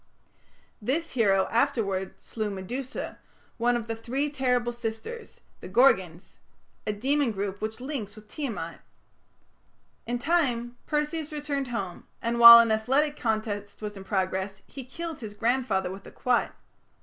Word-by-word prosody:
This 300 +10 -1
hero 195 -6 +3
afterwards 225 -7 0
slew 215 -2 -3
Medusa, 235 +7 -5 0.4
one 240 +1 +3
of 230 - -5
the 225 0 -3
three 265 +6 -2
terrible 250 -3 +1
sisters, 235 - -6 0.2
the - - -9
Gorgons 190 -9 +2 0.5
a - - +2
demon 270 +6 +1
group 200 -1 -4
which 220 +1 -3
links 250 -6 -5
with 215 -1 -14
Tiamat. 210 - -5 1.3
In 240 +1 -1
time, 245 -5 0
Perseus 300 +1 -1
returned 290 -2 -2
home, 195 -8 -5
and 235 +1 -1
while 235 0 +13
an 230 -1 +5
athletic 270 +7 +2
contest 215 -4 -2
was 210 0 -4
in 195 - -9
progress, 190 0 -2
he 270 - -9
killed 330 +4 -6
his 215 -4 -8
grandfather 225 -5 0
with 195 +1 -9
a - - -11
quoit. 250 -1 +1
235 Hz, 140 wpm, -27 LUFS, 205-270 Hz, 1.3 s, while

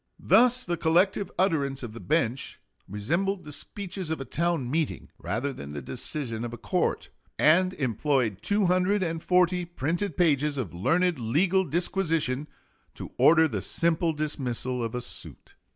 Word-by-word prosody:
Thus 250 +1 +4
the 175 -1 -2
collective 185 +5 +2
utterance 140 -8 0
of 115 -3 -6
the 115 - -9
bench 140 -4 -1 0.3
resembled 170 - -1
the 150 - -9
speeches 190 +2 -5
of 160 - -2
a 135 - -5
town 170 -1 -1
meeting 160 0 -2
rather 130 +6 -2
than 70 - -9
the 75 - -5
decision 115 - -4
of 120 - -4
a - - -6
court, - - -1 0.3
and 185 +5 +4
employed 125 -5 0
240 180 -2 +2
printed 175 +4 -3
pages 150 -4 +2
of 115 -11 -4
learned 165 - +1
legal 170 +12 +2
disquisition 165 -4 0 0.5
to - - -8
order 160 0 +6
the 105 -9 -3
simple 165 - +1
dismissal 130 -5 -2
of 115 +1 -4
a 125 - -2
suit. - - -6
155 Hz, 145 wpm, -27 LUFS, 130-180 Hz, 0.5 s, order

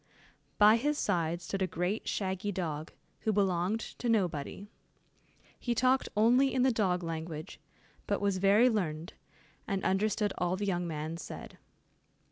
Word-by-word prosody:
By 210 +2 +7
his 295 +5 0
side 170 - 0
stood 195 +3 -4
a 190 - +2
great 180 +5 -2
shaggy 190 +1 -2
dog, 160 -5 -4 0.3
who 220 - 0
belonged 195 0 +1 0.2
to 245 - -1
nobody. 190 -3 -1 0.9
He 240 -1 -1
talked 255 +2 +2
only 250 +5 +5
in 255 - +3
the 260 - +4
dog 185 -6 0
language, 160 -1 -5 0.5
but - - 0
was 200 -2 0
very 200 +5 +5
learned, 170 -8 -1 0.5
and 195 -3 -2
understood 205 +1 +1
all 180 +1 +1
the 205 +2 -3
young 175 -3 -1
man 155 +1 -4
said. - - -9
195 Hz, 145 wpm, -31 LUFS, 170-220 Hz, 0.9 s, By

